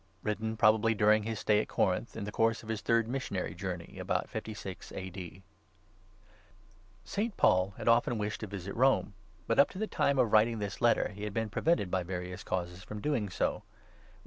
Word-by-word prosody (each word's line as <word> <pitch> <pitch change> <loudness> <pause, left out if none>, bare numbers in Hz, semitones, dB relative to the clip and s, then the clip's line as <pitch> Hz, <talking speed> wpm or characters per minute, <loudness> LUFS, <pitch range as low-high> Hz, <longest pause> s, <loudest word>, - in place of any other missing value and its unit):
WRITTEN 110 +1 -2
PROBABLY 110 +1 +4
DURING 105 +1 +4
HIS 110 0 -4
STAY 105 0 +3
AT - - -6
CORINTH, 100 +4 0
IN 110 - -4
THE 105 - -4
COURSE 115 +2 +1
OF 110 - -11
HIS 110 -2 -2
THIRD 115 -1 +2
MISSIONARY 120 -7 -3
JOURNEY, 90 -2 -6
ABOUT - - -1
56 100 -3 -6
A.D. 95 -1 -7 1.6
ST. 210 +1 -2
PAUL 95 +2 +3
had - - -6
often 120 0 +4
wished 105 0 -2
to 110 - -5
visit 100 -1 -6
Rome, 130 -4 +3 0.3
but - - +1
up 140 - +7
to - - -10
the 220 - 0
time 140 -9 +1
of 120 -4 +2
writing 110 +2 +5
this 105 -1 -5
Letter 120 -1 +3
he 105 0 -9
had 105 -1 -4
been 110 -2 -1
prevented 135 - +1
by 95 - +1
various 90 0 -5
causes 90 0 -3
from 105 +2 -7
doing 120 -5 -1
so - - +1
(Rom. - - -10
105 Hz, 195 wpm, -31 LUFS, 95-115 Hz, 1.6 s, up